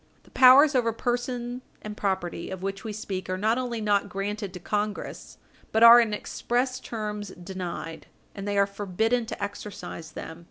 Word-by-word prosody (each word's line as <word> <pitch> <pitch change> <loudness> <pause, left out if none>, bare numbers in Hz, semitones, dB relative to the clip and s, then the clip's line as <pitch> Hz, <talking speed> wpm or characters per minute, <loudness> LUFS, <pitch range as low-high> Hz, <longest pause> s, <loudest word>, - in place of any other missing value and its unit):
The - - -22
powers 270 +4 +7
over 240 -3 +2
person 245 +1 -3 0.2
and 210 0 -6
property 190 -4 -2
of 190 -1 -6
which 195 0 -4
we 220 - -4
speak 195 -3 -5
are 185 - -1
not 220 +5 +1
only 245 -2 -3
not 205 -1 +1
granted 200 +1 -3
to - - -6
Congress, 210 +3 -4 0.3
but 220 +1 +3
are 235 +1 +11
in 225 -2 0
express 245 +4 -1
terms 210 -2 -5
denied, 175 -3 -7 0.3
and 200 0 -6
they 205 0 -1
are 200 - +5
forbidden 210 +4 -1
to 205 - -5
exercise 200 -5 -7
them. 160 - -8
210 Hz, 170 wpm, -26 LUFS, 195-235 Hz, 0.3 s, are